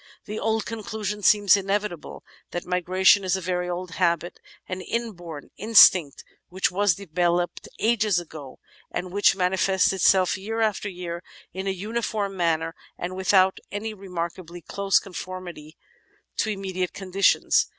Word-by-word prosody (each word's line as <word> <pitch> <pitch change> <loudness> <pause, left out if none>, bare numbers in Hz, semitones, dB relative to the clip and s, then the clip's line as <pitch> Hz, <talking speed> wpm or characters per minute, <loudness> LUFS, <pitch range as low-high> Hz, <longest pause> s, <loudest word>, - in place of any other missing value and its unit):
The 220 +1 -1
conclusion 215 -2 -4
seems 205 -1 +5
inevitable 200 -3 -3 0.3
that 175 - -5
migration 185 +2 +3
is 185 0 +1
a - - -2
very 180 0 -2
old 180 0 -4
habit, 170 -1 0 0.3
an 185 0 -4
inborn 175 -10 -5
instinct 190 -8 +6 0.3
which 185 +1 0
was 195 -1 +2
developed 175 -1 -1
ages 215 -5 +2
ago, 155 -6 -10 0.3
and 180 0 -4
which 200 0 +4
manifests 190 +1 +2
itself 190 0 +3
year 220 +4 -4
after 215 -2 0
year 175 -2 -6 0.3
in 190 +1 -5
a - - +2
uniform 205 +1 -3
manner 165 -2 0 0.2
and 180 +1 -5
without 190 0 +3
any 215 +2 -4
remarkably 175 -3 -6
close 195 -2 +1
conformity 180 -4 -7 0.6
to 220 - 0
inunediate 190 -3 -3
conditions. 195 0 +2
185 Hz, 130 wpm, -25 LUFS, 175-205 Hz, 0.6 s, instinct